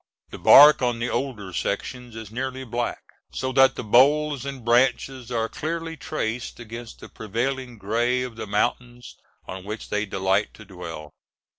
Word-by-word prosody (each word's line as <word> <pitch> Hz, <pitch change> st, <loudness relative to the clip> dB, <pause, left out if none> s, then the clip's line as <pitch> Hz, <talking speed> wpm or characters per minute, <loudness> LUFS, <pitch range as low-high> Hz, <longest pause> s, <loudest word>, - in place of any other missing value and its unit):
The -, -, -8 dB
bark 150 Hz, +1 st, +8 dB
on 120 Hz, -2 st, +1 dB
the 120 Hz, +1 st, -2 dB
older 105 Hz, -9 st, -3 dB
sections 120 Hz, +6 st, -4 dB
is 110 Hz, -2 st, -8 dB
nearly 130 Hz, +2 st, -4 dB
black, 120 Hz, -1 st, -3 dB, 0.3 s
so 130 Hz, 0 st, -3 dB
that 135 Hz, 0 st, +5 dB
the -, -, -5 dB
boles 140 Hz, +5 st, +3 dB
and 135 Hz, -4 st, -7 dB
branches 125 Hz, +1 st, +1 dB
are 115 Hz, -2 st, 0 dB
clearly 165 Hz, +4 st, -4 dB
traced 120 Hz, -8 st, -4 dB
against 115 Hz, 0 st, -9 dB
the -, -, -9 dB
prevailing 125 Hz, +3 st, -4 dB
gray 120 Hz, +5 st, 0 dB
of 125 Hz, -3 st, -7 dB
the 110 Hz, -, -6 dB
mountains 120 Hz, +3 st, -2 dB, 0.3 s
on 95 Hz, 0 st, -7 dB
which 105 Hz, +3 st, -7 dB
they 105 Hz, +1 st, -1 dB
delight 95 Hz, +2 st, 0 dB
to 110 Hz, -, -13 dB
dwell. 85 Hz, -5 st, -9 dB
120 Hz, 160 wpm, -24 LUFS, 110-130 Hz, 0.3 s, bark